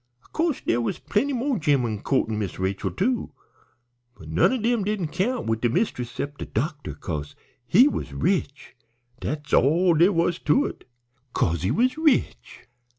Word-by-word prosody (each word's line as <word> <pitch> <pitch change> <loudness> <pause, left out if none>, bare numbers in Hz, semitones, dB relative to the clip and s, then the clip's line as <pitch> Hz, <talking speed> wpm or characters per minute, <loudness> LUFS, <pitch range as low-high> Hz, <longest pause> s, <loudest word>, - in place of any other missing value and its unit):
Of - - -27
co'se 320 -4 0
dere 120 - +1
was 115 - -2
plenty 270 +8 0
mo' 260 -2 -1
gemmen 125 -9 +1
co'rting 110 -5 0
Miss 100 -4 -4
Rachel, 95 +1 -2
too, 235 +5 -1 0.8
but 80 - -12
none 80 +3 +3
o' 260 - 0
dem 230 -1 +1
didn't 195 -5 -2
count 225 +9 -1
wid 110 0 -1
de 120 - +2
mist'ess 125 - -1
'cept 145 +4 -5
de - - -5
doctor, 145 +5 -3
'cause 75 -5 -5 0.3
he 245 +10 +6
was - - -3
rich, 165 -8 -2 0.4
dat's 150 -1 -5
all 170 +6 +4
dere 170 +5 +5
was 170 -1 +1
to 280 - +2
't, - - -20 0.5
'cause 85 -2 0
he 90 - 0
was 255 +6 +1
rich. 260 - 0
160 Hz, 170 wpm, -24 LUFS, -, 0.8 s, he